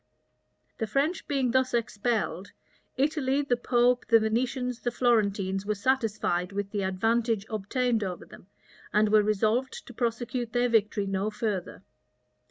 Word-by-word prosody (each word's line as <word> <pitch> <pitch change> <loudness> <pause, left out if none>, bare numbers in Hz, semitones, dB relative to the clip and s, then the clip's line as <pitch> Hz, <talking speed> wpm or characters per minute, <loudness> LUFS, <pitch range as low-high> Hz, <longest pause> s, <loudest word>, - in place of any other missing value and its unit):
The 225 - -1
French 285 - -1
being 270 -4 0
thus 260 -1 +2
expelled 215 -4 -2 0.4
Italy, 280 0 +1
the 255 -3 +1
pope, 245 0 +2
the 230 -1 +6
Venetians, 250 +3 -1
the 240 - -1
Florentines, 200 -6 +1
were 210 +1 -1
satisfied 205 -6 0
with 200 0 -4
the 205 - -2
advantage 225 +3 0
obtained 225 +2 0
over 185 -2 -5
them, - - -15 0.4
and 210 0 +3
were 215 0 +5
resolved 215 +5 0
to 245 - -11
prosecute 240 0 -2
their 245 0 +2
victory 215 -2 +2
no 195 +1 -1
further. 210 -4 -4
225 Hz, 140 wpm, -28 LUFS, 205-250 Hz, 0.4 s, the